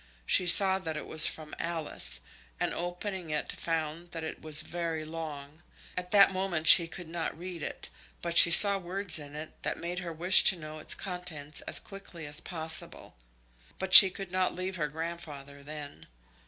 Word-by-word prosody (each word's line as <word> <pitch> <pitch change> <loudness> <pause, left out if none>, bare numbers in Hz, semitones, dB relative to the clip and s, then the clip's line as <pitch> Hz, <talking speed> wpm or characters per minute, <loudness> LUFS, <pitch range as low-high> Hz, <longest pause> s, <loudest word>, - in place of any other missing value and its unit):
She 180 - +1
saw 190 +2 +5
that 160 -4 -7
it - - -9
was 160 0 +4
from 155 -1 -9
Alice, 155 - -5 0.4
and - - -3
opening 175 0 -7
it 150 0 -5
found 165 +1 -7
that 165 -1 -8
it 160 - -9
was 155 -1 0
very 165 -2 -7
long. 155 -1 -10 0.3
At 180 0 -7
that 200 -1 +4
moment 185 -4 -5
she 165 +1 +8
could 175 0 -10
not 165 0 -7
read 175 -1 -10
it, - - -8 0.3
but 170 0 -7
she 170 - +8
saw 200 +4 +9
words 185 -1 -2
in 145 0 -12
it 155 +1 -9
that - - -5
made 175 +1 -7
her 175 -1 -8
wish 175 +4 +4
to - - +4
know 155 -2 -12
its - - 0
contents 180 -6 -7
as - - 0
quickly 190 -5 -13
as 145 +2 -4
possible. 160 - -7 0.6
But 190 -1 -6
she 190 - +11
could 190 0 -11
not 185 0 -2
leave 185 +1 -6
her 150 -3 -4
grandfather 150 -3 -10
then. 145 0 -12
170 Hz, 180 wpm, -27 LUFS, 155-180 Hz, 0.6 s, she